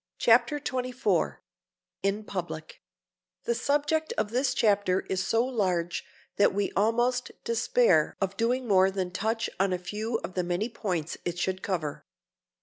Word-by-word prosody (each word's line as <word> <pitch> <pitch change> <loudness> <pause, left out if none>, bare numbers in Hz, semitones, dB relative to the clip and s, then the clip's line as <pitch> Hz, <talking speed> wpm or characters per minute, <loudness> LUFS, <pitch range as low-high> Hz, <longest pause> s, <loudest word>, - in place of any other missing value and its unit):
CHAPTER 240 +5 +4
XXIV 255 -2 -1 0.6
IN 200 +2 0
PUBLIC 170 -6 -6 0.6
THE 235 - +1
subject 295 - 0
of 210 - 0
this 255 +1 +1
chapter 205 -6 +2
is 190 0 -2
so 225 +5 +2
large 185 -9 -1 0.3
that 200 - +4
we 205 -1 0
almost 240 +4 +1
despair 230 -8 +2
of 195 -1 -1
doing 245 +2 0
more 190 -2 +5
than 190 -2 -3
touch 220 +4 -1
on 195 0 +2
a 180 - +1
few 210 +6 -3
of 185 - -5
the 180 - 0
many 175 +6 -1
points 180 -8 -3
it 175 0 -3
should 185 +1 -1
cover. 165 -7 -3
205 Hz, 145 wpm, -28 LUFS, 185-240 Hz, 0.6 s, more